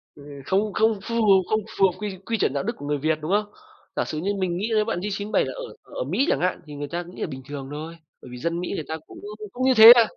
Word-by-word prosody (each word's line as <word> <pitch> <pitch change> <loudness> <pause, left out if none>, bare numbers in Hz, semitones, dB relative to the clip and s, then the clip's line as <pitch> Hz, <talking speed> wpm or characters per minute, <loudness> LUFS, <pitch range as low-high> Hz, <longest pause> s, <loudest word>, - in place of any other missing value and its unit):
Ờ, 145 - -14 0.2
không 200 +2 +1
không 220 -1 +2
phù 215 -5 +4
không 215 - +3 0.2
phù 195 - +6
hợp 185 - +4
quy 205 -3 -4
quy 230 - 0
chuẩn 140 - +1
đạo 140 - -1
đức - - -1
của 145 - -8
người 145 0 0
Việt, 155 +2 +1
đúng 155 +5 -3
không? 210 +1 +3 0.5
Giả - - 0
sử 155 - -4
như 190 +6 -1
mình 175 -2 0
nghĩ 205 +5 -2
nếu 215 -1 +3
bạn 200 -6 -1
J97 205 +1 0
là - - -5
ở - - -6 0.2
ở - - -5
Mỹ 275 - +1
chẳng - - +2
hạn, 180 +3 0
thì 150 - -10
người 145 0 -4
ta 175 +4 -3
nghĩ 175 +2 -11
là - - 0
bình 130 -3 -7
thường 140 -2 -6
thôi. 160 +3 -6 0.2
Bởi 125 - -12
vì 125 - -7
dân 170 +6 -2
Mỹ 180 - -3
người 160 - -3
ta 160 - -3
cũng - - -12 0.3
cũng 255 +1 -3
như 260 - +5
thế 225 +1 +13
à. 235 -2 +8
185 Hz, 295 wpm, -24 LUFS, 155-215 Hz, 0.5 s, thế